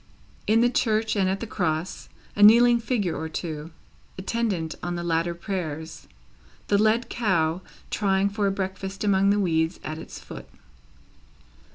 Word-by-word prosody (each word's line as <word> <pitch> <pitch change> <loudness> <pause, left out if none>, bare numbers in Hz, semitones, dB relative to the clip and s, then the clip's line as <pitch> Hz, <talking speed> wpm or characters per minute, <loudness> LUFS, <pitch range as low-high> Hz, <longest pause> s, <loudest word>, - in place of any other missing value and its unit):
In 225 +2 +4
the 240 - +4
church 220 -3 +1
and 190 -2 +2
at 190 +1 -2
the - - -2
Cross, 175 -5 -3 0.3
a 205 - -2
kneeling 235 +3 +7
figure 225 -7 -1
or 160 0 -4
two; 155 -1 -5 0.5
attendant 190 -5 -2
on 175 +1 -3
the 175 - -4
latter 170 0 0
prayers, 160 -4 -5 0.6
the 200 - +3
led 220 +3 +2
cow, 180 -7 0 0.3
trying 195 -1 +2
for 200 0 -1
a - - +1
breakfast 195 0 -4
among 195 -1 +3
the 205 +1 +3
weeds 165 -2 0
at 155 +1 -5
its - - -9
foot. - - -10
190 Hz, 155 wpm, -25 LUFS, 165-215 Hz, 0.6 s, kneeling